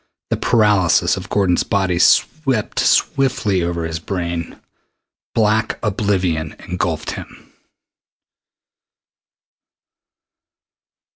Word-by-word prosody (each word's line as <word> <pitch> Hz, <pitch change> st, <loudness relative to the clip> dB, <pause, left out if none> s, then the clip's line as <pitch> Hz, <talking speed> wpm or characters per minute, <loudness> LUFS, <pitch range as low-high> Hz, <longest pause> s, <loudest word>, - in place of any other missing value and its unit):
The -, -, +3 dB
paralysis 100 Hz, -6 st, +3 dB
of 95 Hz, 0 st, -8 dB
Gordon's 95 Hz, -4 st, +2 dB
body 95 Hz, -3 st, 0 dB
swept 135 Hz, -, +2 dB
swiftly 130 Hz, -8 st, +1 dB
over 85 Hz, -1 st, -2 dB
his 80 Hz, -1 st, -4 dB
brain. 85 Hz, -2 st, -4 dB, 0.8 s
Black 110 Hz, 0 st, +1 dB
oblivion 95 Hz, -7 st, -1 dB
engulfed 85 Hz, -3 st, -2 dB
him. -, -, -11 dB
95 Hz, 75 wpm, -19 LUFS, 85-105 Hz, 0.8 s, The